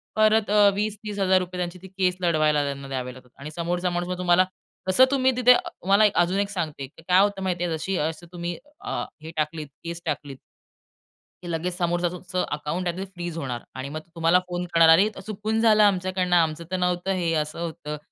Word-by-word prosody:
परत 215 -1 +3
अ, 205 -1 +6
₹20,000-30,000 200 -3 0
त्यांची 180 +1 -4
ती 190 - -10
केस 185 -1 0
लढवायला 155 -3 +2
त्यांना 140 -1 -4
द्यावे 130 -1 -4
लागतात. 125 0 -16
आणि 145 +2 -7
समोरचा 175 +1 -1
माणूस 175 0 -2
मग 180 - -2
तुम्हाला 180 0 +4 0.4
तसं 255 +8 +6
तुम्ही 260 -1 +3
तिथे 250 0 +6
अ - - +2
तुम्हाला 200 +3 +3 0.2
अजून 180 +3 +1
एक 200 0 0
सांगते. 155 -8 -4
की 155 - -18
काय 185 +1 +6
होतं 200 -1 +1
माहिती 175 -2 -1
आहे? 165 -2 -1
जशी 190 +4 -2
अशी 165 +1 -6
तुम्ही 175 -1 -4 0.2
अ, - - -3 0.2
हे 160 +1 -8
टाकलीत 155 0 -2 0.2
केस 170 0 -6
टाकलीत 145 -3 -4 1.1
की - - -7
लगेचं 170 +2 -2
समोरचं 175 -1 0
तुमचं 180 0 -3
अकाउंट 150 +5 -3
आहे 175 +1 -2
ते 190 - -3
फ्रीज 175 -3 -7
होणार 125 -6 -4
आणि 130 +1 -5
मग 155 +2 -5
ते 165 - -20
तुम्हाला 165 +2 +4
फोन 175 0 -3
करणार, 165 -1 +6
"अरे, 185 +6 +7
त - - -8
चुकून 215 +1 -2
झालं 215 -2 +5
आमच्याकडनं 185 -2 +2
आमचं 165 -1 +2
तर 185 - 0
नव्हतं. 180 +1 0
हे 175 -3 0
असं 150 +2 -6
होतं." 160 -3 -5
175 Hz, 205 wpm, -25 LUFS, 160-190 Hz, 1.1 s, अरे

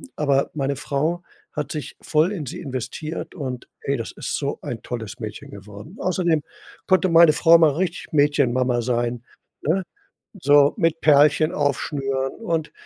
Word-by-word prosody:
aber 140 -2 +1
meine 140 -2 -1
Frau 155 +5 -2 0.3
hat 150 0 -4
sich 150 -2 -6
voll 160 +5 +2
in 165 -8 -4
sie - - -7
investiert 140 +5 -5
und, 130 -6 -5
ey, 140 -1 -1
das 115 - -5
ist - - -4
so 140 -1 -3
ein 120 - -6
tolles 120 0 -6
Mädchen 110 -2 -7
geworden. 100 - -11
Außerdem 175 -5 +1 0.4
konnte 185 0 +3
meine 165 -2 +7
Frau 165 +1 +6
mal 160 -3 +5
richtig 175 +1 -3
Mädchenmama 130 -4 +2
sein, 120 0 -1 0.4
ne, 180 +5 0 0.6
so 145 0 +5
mit 165 -4 +1
Perlchen 150 +1 +4
aufschnüren 135 -2 -1
und 165 -8 -2
145 Hz, 150 wpm, -22 LUFS, 130-165 Hz, 0.6 s, meine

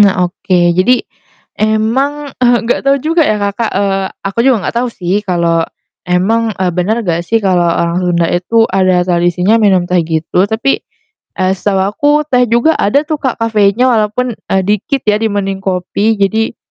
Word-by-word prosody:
nah 195 -3 +4
oke, 185 +1 -1
jadi 190 +9 +2 0.6
emang, 260 +7 0
eee, 245 -1 +4
gak 235 - 0
tau 275 - +4
juga 320 +5 0
ya 215 - +1
Kakak 205 +2 -2
eee, 195 -1 0 0.2
aku 195 +3 -4
juga 240 -6 +2
gak - - -5
tau 250 - -1
sih 195 -2 -2
kalo 170 -4 0 0.5
emang, 215 +5 0
eee, 185 -2 -1
bener 210 +7 -1
gak 170 -2 -1
sih 230 - +2
kalo 185 -2 +2
orang 170 +1 0
Sunda 175 -2 0
itu 225 +6 +2
ada 185 -2 +2
tradisinya 180 +4 +1
minum 190 -4 +3
teh 180 0 +1
gitu, 165 +4 -1
tapi, 225 +6 0 0.6
eee, 185 0 +1
setahu 195 0 -1
aku 290 +7 0 0.2
teh 250 0 +4
juga 235 +8 +3
ada 280 +9 +2
tuh 310 -1 -3
Kak 260 -3 -2
kafeinnya 230 +2 +2
walaupun, 225 +3 0
eee, 190 0 -2
dikit 210 +7 -1
ya 210 -1 +2
dibanding 200 -3 -2
kopi. 195 +3 -1
Jadi 215 +3 0
205 Hz, 170 wpm, -13 LUFS, 180-230 Hz, 0.6 s, nah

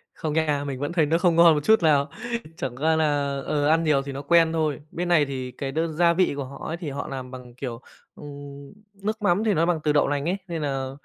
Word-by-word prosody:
Không 155 -2 -3
nha. 150 -3 +1
Mình 130 -2 -4
vẫn 145 +3 -3
thấy 160 -4 +3
nó 165 +3 +2
không 175 -2 +2
ngon 170 -1 +7
một 150 - -2
chút 220 -2 +4
nào. 145 -2 +3 0.5
Chẳng 125 -2 -4
qua 160 +3 +2
là, 145 -3 0
ờ, 145 -1 0
ăn 165 +1 +3
nhiều 150 -3 +2
thì 140 - -6
nó 135 +1 -5
quen 165 +2 +4
thôi. 155 -3 0
Bên 175 +1 -3
này 170 -4 +4
thì 130 -2 -5
cái 135 +1 -5
đơn 160 +2 -1
gia 170 +1 +3
vị 180 -3 +2
của 140 - -3
họ 140 - -9
ấy, 165 - -3
thì 170 -4 -5
họ 140 +1 -5
làm 130 -1 -6
bằng, 125 -2 -10
kiểu, 125 -2 -6 0.3
ừm, 140 0 -10 0.3
nước 215 +2 -3
mắm 200 +1 +2
thì 215 -2 +2
nó 165 +1 +2
bằng 175 -2 +1
từ 150 -1 +2
đậu 145 - +3
lành 145 0 -1
ấy. 190 - 0
Nên 165 -2 -4
là 135 -2 -2
150 Hz, 260 wpm, -24 LUFS, 140-165 Hz, 0.5 s, ngon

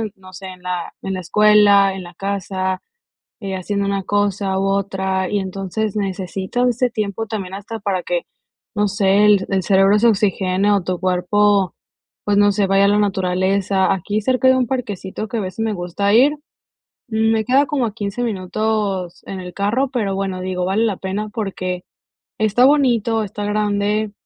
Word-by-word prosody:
no 185 -1 -16
sé, 190 +2 -8
en 185 -1 -11
la 180 -1 -4
en 195 - -3
la 185 - -3
escuela, 205 0 +5
en 190 - -6
la 175 0 -12
casa, 190 -1 -3 0.6
eh, 195 -4 -5
haciendo 200 +2 -2
una 200 -1 -1
cosa 200 -1 0
u 195 - 0
otra, 190 -1 -1
y 205 - +1
entonces 195 +2 -3
necesitas 195 +4 -2
ese 245 +1 +1
tiempo 215 -1 -3
también 195 -4 -5
hasta 205 +3 -6
para 200 -3 -2
que, 175 -1 -2 0.5
no 210 -1 +1
sé, 200 0 +3
el 205 -2 +4
el 190 -1 +1
cerebro 195 +2 +4
se 235 - +5
oxigene 195 -1 +1
o 200 -2 +2
tu 180 0 -3
cuerpo, 190 +1 +2 0.5
pues, 205 -1 +2
no 205 0 +5
sé, 200 0 +1
vaya 195 +1 +4
a - - +3
la 205 +1 +3
naturaleza. 190 0 +1
Aquí 205 +4 -2
cerca 260 +2 +2
de 260 - +5
un 250 -2 +1
parquecito 215 -5 -4
que 230 - -4
a - - 0
veces 185 +2 -5
me 220 -1 0
gusta 185 +3 -1
ir, 280 +6 +5 0.7
me 220 0 +1
queda 270 +3 +3
como 265 -5 0
a 215 - -6
15 210 +2 -4
minutos 200 -3 -2
en 190 -1 -6
el 180 -1 -8
carro, 225 +7 0
pero 210 -6 -1
bueno, 190 -1 -3
digo, 185 -1 -2
vale 195 +5 +1
la 200 -4 -1
pena 195 +3 -3
porque 185 -4 -4 0.5
está 215 +3 +3
bonito, 235 -6 +2
está 205 +1 -6
grande 210 0 0
200 Hz, 180 wpm, -19 LUFS, 190-215 Hz, 0.7 s, escuela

